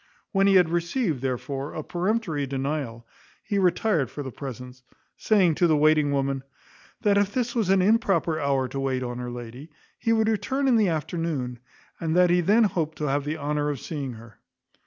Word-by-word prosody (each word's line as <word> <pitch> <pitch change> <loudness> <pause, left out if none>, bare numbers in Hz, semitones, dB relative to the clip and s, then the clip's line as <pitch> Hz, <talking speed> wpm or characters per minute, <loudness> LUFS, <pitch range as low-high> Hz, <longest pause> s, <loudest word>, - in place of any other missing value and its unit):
When 195 0 +3
he 195 - +5
had 180 -3 +5
received, 170 - -1
therefore, 135 +2 -3
a 155 - -4
peremptory 175 -6 -1
denial, 135 -3 -3 0.4
he 200 - -1
retired 180 - +2
for 145 - -6
the 130 - -6
present, 125 -1 -8 0.3
saying 190 -6 +3
to 175 +3 +2
the 155 -2 +3
waiting 150 -1 +4
woman, 135 -1 0 0.6
"That 200 -2 +4
if 205 0 +1
this 245 -2 0
was 225 -6 0
an 190 -1 +4
improper 195 -6 +2
hour 135 -3 +1
to 135 - -4
wait 130 -1 -1
on 120 0 -4
her 125 0 -4
lady, 120 +5 -8 0.3
he 230 - 0
would 220 -1 +3
return 225 +6 0
in 245 -3 +4
the 210 -4 +3
afternoon; 155 -6 -3 0.4
and 165 0 -1
that 180 -1 +5
he 175 0 +4
then 210 +7 +4
hoped 165 -6 -1
to 150 -2 -2
have 140 +1 0
the 155 +2 -2
honour 150 0 -1
of 145 -3 -3
seeing 140 -5 -5
her." 115 0 -14
155 Hz, 195 wpm, -25 LUFS, 135-195 Hz, 0.6 s, he